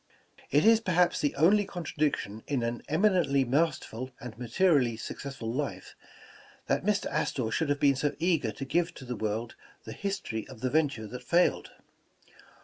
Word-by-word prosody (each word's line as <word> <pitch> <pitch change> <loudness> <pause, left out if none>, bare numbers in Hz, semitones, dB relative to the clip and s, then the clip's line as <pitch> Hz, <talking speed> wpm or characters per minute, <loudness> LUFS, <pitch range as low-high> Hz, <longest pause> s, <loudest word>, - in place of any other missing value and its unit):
' - - -36
' - - -20
It 145 +2 +3
is 225 0 +7
perhaps 180 -5 +2
the 145 - 0
only 200 +7 +5
contradiction 155 - -2
in 140 -5 0
an 115 0 -2
eminently 155 -6 +3
masterful 130 -3 -1
and 125 -3 -8
materially 125 -1 +2
successful 115 -1 -6
life, 145 +2 -4 0.7
that - - 0
Mr. 210 0 +1
Astor 115 -4 -1
should 160 -3 0
have 145 0 +1
been 140 -2 +4
so 145 +2 -1
eager 165 -9 +1
to 135 - -6
give 170 +5 0
to 130 - -10
the 125 0 -4
world 110 +2 -3 0.3
the - - -7
his 200 0 -3
tory 110 -1 -5
of 130 -4 -12
the 130 - -1
venture 145 -8 +1
that 125 +4 -7
failed. 175 +7 +2
140 Hz, 175 wpm, -29 LUFS, 120-170 Hz, 0.7 s, is